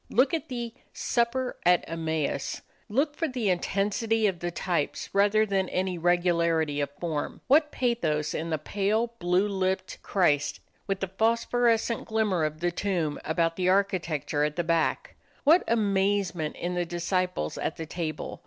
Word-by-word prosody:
Look 265 +4 +3
at 320 -4 -2
the 240 -2 -4 0.2
"Supper 250 +1 0
at 180 0 +4
Emmaus" 160 -4 -2 0.3
look 285 +7 +1
for 325 - -1
the 245 -8 0
intensity 210 +5 0
of 190 -4 +1
the 175 - -2
types 170 -3 -2
rather 205 +2 +4
than 195 -2 0
for - - -10
any 185 0 0
regularity 170 -3 +2
of 140 - -1
form. 160 -4 -3
What 295 +3 +4
pathos 160 - 0
in 165 +1 -3
the 160 - 0
pale, 210 +8 0
blue 180 +3 +2
lipped 190 -1 -2
Christ, 150 -7 +1 0.3
with 195 -1 -1
the 195 - 0
phosphorescent 230 +3 +1
glimmer 215 -7 +1
of 155 +1 -4
the 175 0 +1
tomb 175 -5 -1
about 165 +1 0
the 185 -1 +1
architecture 175 -6 +1
at 150 0 0
the 175 - 0
back! 165 -1 0 0.3
What 320 +5 +6
amazement 195 -6 +1
in 175 +1 -3
the 175 0 0
disciples 175 - -2
at - - -2
the 160 - -4
table! 160 -2 -5
185 Hz, 160 wpm, -27 LUFS, 165-220 Hz, 0.3 s, What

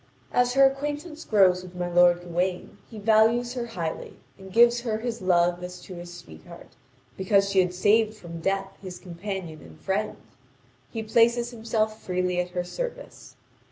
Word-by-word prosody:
As 245 0 +2
her 275 0 +7
acquaintance 295 +4 -2
grows 190 -4 +4
with 180 0 -12
my 180 0 -2
lord 175 0 +4
Gawain, 180 +1 -3
he 225 - -10
values 225 +3 +3
her 245 -2 -4
highly 170 -8 -5 0.2
and 190 -1 -13
gives 235 +3 +5
her 225 -3 -2
his 230 -1 -4
love 175 -1 +2
as 180 0 -7
to 185 - -10
his 175 0 -9
sweetheart, 80 - -13 0.5
because 195 +1 +2
she 195 - +3
had 180 -1 +2
saved 215 +3 +3
from 170 -5 -9
death 195 +2 -1
his 185 -2 -8
companion 175 -3 -6
and 80 -1 -15
friend; 205 +3 -2 0.7
he 225 - -4
places 235 +2 +2
himself 220 -1 -2
freely 180 -1 -1
at 180 0 -1
her 180 0 -3
service. - - -7
195 Hz, 165 wpm, -26 LUFS, 180-230 Hz, 0.7 s, her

